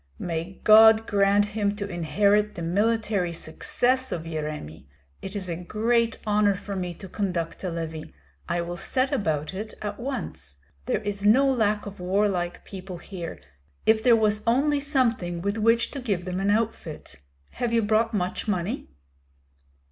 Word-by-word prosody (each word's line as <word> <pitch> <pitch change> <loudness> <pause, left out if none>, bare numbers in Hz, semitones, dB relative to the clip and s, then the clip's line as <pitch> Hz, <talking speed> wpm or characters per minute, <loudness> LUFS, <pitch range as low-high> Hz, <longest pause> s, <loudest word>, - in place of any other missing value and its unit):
"May 170 +2 -4
God 220 +1 +8
grant 200 0 +3
him 205 -1 -1
to 205 -1 -4
inherit 200 +4 +1
the 170 - -5
military 205 0 +1
success 245 +10 0
of 165 - -3
Yeremi! 150 - -5 0.3
It 195 +2 -7
is 195 -2 -3
a 170 - -2
great 225 +6 0
honor 210 -1 +3
for 200 +2 -6
me 180 -2 -3
to 190 - -10
conduct 180 -4 -3
a 185 - -1
levy. 160 -2 -5 0.4
I 175 - 0
will 175 +1 -5
set 260 +8 0
about 160 - -1
it 210 +3 -6
at 205 -1 -5
once. 200 - -5 0.3
There 215 - 0
is 200 -1 -3
no 250 +7 +5
lack 215 -5 +1
of 200 -1 -8
warlike 180 -1 0
people 185 -2 -8
here, 175 -1 -7 0.5
if 220 0 +4
there 235 +1 +6
was 215 -1 +2
only 285 +5 +3
something 235 - 0
with 200 +5 -2
which 230 +2 +3
to 280 - -5
give 200 -9 -2
them 180 0 -3
an 195 +1 0
outfit. 210 -7 -2 0.3
Have 240 -1 -2
you 230 -1 +2
brought 220 +2 +2
much 185 0 -2
money?" 185 - -2
205 Hz, 165 wpm, -25 LUFS, 175-220 Hz, 0.5 s, God